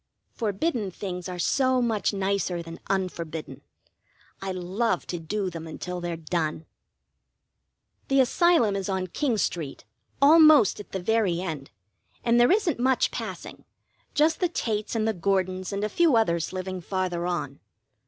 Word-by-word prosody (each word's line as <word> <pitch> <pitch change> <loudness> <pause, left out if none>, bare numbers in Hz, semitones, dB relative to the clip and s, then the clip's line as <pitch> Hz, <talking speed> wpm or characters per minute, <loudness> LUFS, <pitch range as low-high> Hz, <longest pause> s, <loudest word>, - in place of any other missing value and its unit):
Forbidden 220 - -1
things 180 -1 -6
are 180 - -5
so 260 +7 +2
much 225 -4 +1
nicer 195 -3 -1
than 165 0 -9
unforbidden. 170 -5 -3 0.8
I 195 0 -3
love 185 +2 -1
to 175 - -4
do 190 +3 -3
them 165 -1 -7
until 180 +3 -5
they're 175 -1 -3
done. 160 -1 -2 1.4
The 270 0 +3
Asylum 265 - +4
is 195 0 -3
on 190 -1 -1
King 235 - -1
Street, 160 - -3 0.3
almost 305 - +7
at 205 - -10
the 190 - -3
very 205 -4 +1
end, 155 -7 -5 0.5
and 235 0 +3
there 240 - +5
isn't 375 - +2
much 260 +1 +2
passing, - - -7 0.5
just 315 +2 +3
the 360 - +1
Tates 215 -8 -2
and 220 -1 +1
the 220 - +1
Gordons 185 0 -1
and 200 +1 -2
a - - +2
few 315 +5 +3
others 170 -8 +1
living 185 0 -4
farther 180 -1 -2
on. 145 -6 -3
195 Hz, 150 wpm, -26 LUFS, 175-235 Hz, 1.4 s, almost